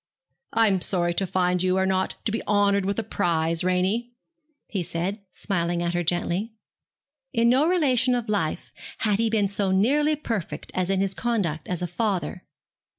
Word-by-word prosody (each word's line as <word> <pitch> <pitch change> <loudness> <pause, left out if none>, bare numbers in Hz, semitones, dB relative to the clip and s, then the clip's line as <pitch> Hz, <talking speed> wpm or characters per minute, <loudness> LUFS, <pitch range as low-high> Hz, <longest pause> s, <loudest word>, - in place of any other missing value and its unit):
'I 225 0 +5
am 190 -3 +1
sorry 175 -2 +1
to 190 +2 -1
find 180 0 +1
you 185 0 +2
are 190 - +2
not 190 0 0
to 220 - 0
be 225 - -2
honoured 200 -1 +2
with 200 - -1
a 225 - 0
prize, 170 -5 0
Ranie,' 190 +7 0 0.5
he 195 - -2
said, 175 +5 -3
smiling 175 -3 -1
at 170 0 -1
her 175 - 0
gently. 175 +6 -1 0.8
In 235 -1 +3
no 265 +6 +4
relation 260 -8 +3
of 240 -2 -3
life 190 -6 -2 0.3
had 210 -2 +2
he 230 0 +2
been 215 -2 +2
so 200 0 -1
nearly 285 +11 +3
perfect 225 - -4
as 185 0 -1
in 195 -1 +1
his 195 -1 0
conduct 190 -9 -2
as 180 -1 -2
a - - -1
father. 180 -2 -2
195 Hz, 180 wpm, -25 LUFS, 180-225 Hz, 0.8 s, I